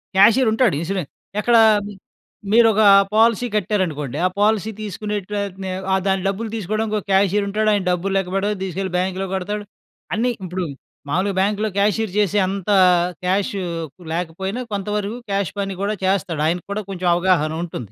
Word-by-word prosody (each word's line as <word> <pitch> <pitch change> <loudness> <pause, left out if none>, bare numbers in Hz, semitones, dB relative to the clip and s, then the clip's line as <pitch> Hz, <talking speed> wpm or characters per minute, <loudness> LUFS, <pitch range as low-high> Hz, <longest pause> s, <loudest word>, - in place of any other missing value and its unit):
క్యాషియరుంటాడు. 225 - +4
Insurance 180 -3 -3 0.3
ఎక్కడ? 235 +2 +2 1.0
మీరొక 225 -2 +5 0.3
policy 230 +2 +3
కట్టారనుకోండి. 165 - -1
ఆ - - +5
పాలసీ 215 0 +2
తీసుకునే 210 +1 -4
ట్ - - -16
అతనే 190 -1 -6 0.2
ఆహ్, 190 - +2
దాని 190 -1 +1
డబ్బులు 215 +3 -2
దీసుకోడానికి 215 +1 -2
ఒక - - -13
క్యాషియరుంటాడు. 200 +2 +2
ఆయన 200 -2 +1
డబ్బులు 185 +2 -1
లేక్కపెడతాడు, 195 +2 -1
దీసుకెళ్ళి 190 0 -4
బ్యాంకులో 190 +1 -1
కడతాడు, 205 +3 -3 0.5
అన్నీ 245 +3 +1
ఇప్పుడు 180 0 -3 0.4
మావులుగా 185 +5 0
బ్యాంకులో 210 +2 +1
క్యాషియర్ 210 -1 +1
జేసే, 205 0 +2
అంత 195 0 -4 0.6
క్యాషు 195 +1 0 0.5
లేకపోయినా, 190 +7 -3
కొంతవరకు 210 +3 -2
క్యాష్ 195 -4 0
పని 195 -1 -2
గూడా 210 +1 0
చేస్తాడు. 180 -5 0
ఆయన 175 +2 0
కూడా 215 +1 -2
కొంచెం 185 -2 -3
అవగాహన 175 -4 +2
ఉంటుంది. 120 - -7
195 Hz, 140 wpm, -21 LUFS, 185-210 Hz, 1.0 s, మీరొక